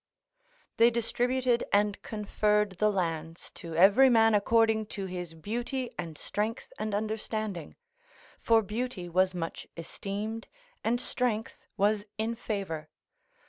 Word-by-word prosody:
["They 230 +1 +7
distributed 240 +1 +1
and 205 0 +2
conferred 210 -2 0
the 215 0 +4
lands 165 -3 -3
to 165 -2 -8
every 200 +10 +7
man 225 -2 +5
according 220 +1 +3
to 195 - -2
his 180 -3 -6
beauty 240 - -3
and 160 -3 -6
strength 215 +7 -3
and 215 -1 -1
understanding, 215 -4 -3 0.6
for 225 -1 +4
beauty 215 -3 -3
was 185 +2 +2
much 165 -2 -4
esteemed 205 +6 -5 0.4
and 240 +2 +1
strength 240 -3 -1 0.2
was 205 +1 +2
in 220 +2 -1
favour." 195 -9 -4
210 Hz, 120 wpm, -29 LUFS, 185-225 Hz, 0.6 s, They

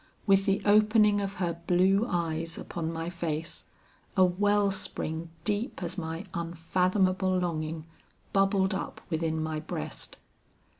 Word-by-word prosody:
With 195 0 +4
the 195 0 +2
opening 210 0 +5
of 195 0 -3
her 170 -3 -2
blue 190 +5 +4
eyes 165 -1 -1
upon 165 -1 -4
my 165 0 -4
face, 165 -2 -4 0.5
a 185 - +7
well 205 +2 +2
spring 165 -3 -3
deep 205 - -1
as 170 +1 -3
my 165 +1 -4
unfathomable 185 +3 +1
longing, 160 -3 -2 0.5
bubbled 195 0 +3
up - - -4
within 160 0 0
my 155 -1 -2
breast. 115 - -6
180 Hz, 130 wpm, -29 LUFS, 165-195 Hz, 0.5 s, a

